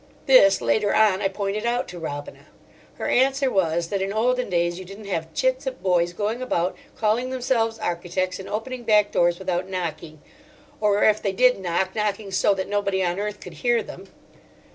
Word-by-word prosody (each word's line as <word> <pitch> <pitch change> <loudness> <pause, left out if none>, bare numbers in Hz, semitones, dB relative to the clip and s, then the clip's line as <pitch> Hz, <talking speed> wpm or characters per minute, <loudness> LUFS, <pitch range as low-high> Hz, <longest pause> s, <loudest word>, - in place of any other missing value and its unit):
This, 255 -8 +6
later 210 -2 +1
on, 210 -3 +4
I - - +2
pointed 200 +2 -3
out 240 +1 0
to 175 - -8
Robina. 145 -3 -7 0.5
Her - - -4
answer 270 +1 +2
was 170 -3 0
that 200 -1 -1
in 195 +1 -1
olden 250 +3 0
days 175 0 0
you - - -7
didn't 195 +3 -11
have 165 -4 -3
chits 260 0 0
of 255 -8 -5
boys 175 -2 +2
going 215 +6 -3
about, 180 -8 -1 0.2
calling 225 +4 +1
themselves 245 -3 0
architects, 180 0 -2
and 190 - -8
opening 245 +4 -4
back 210 -3 +3
doors 175 0 +2
without 185 0 -2
knocking; 165 -4 -5 0.6
or 210 -1 +2
if 215 0 +4
they 195 - -1
did 250 +2 +4
knock, 185 +1 -1
knocking 210 -1 -2
so 195 +1 +2
that 190 -1 -3
nobody 200 -2 0
on 175 +1 -1
earth 210 0 -4
could - - -10
hear 240 -3 +2
them. 190 +2 -11
200 Hz, 185 wpm, -23 LUFS, 180-225 Hz, 0.6 s, This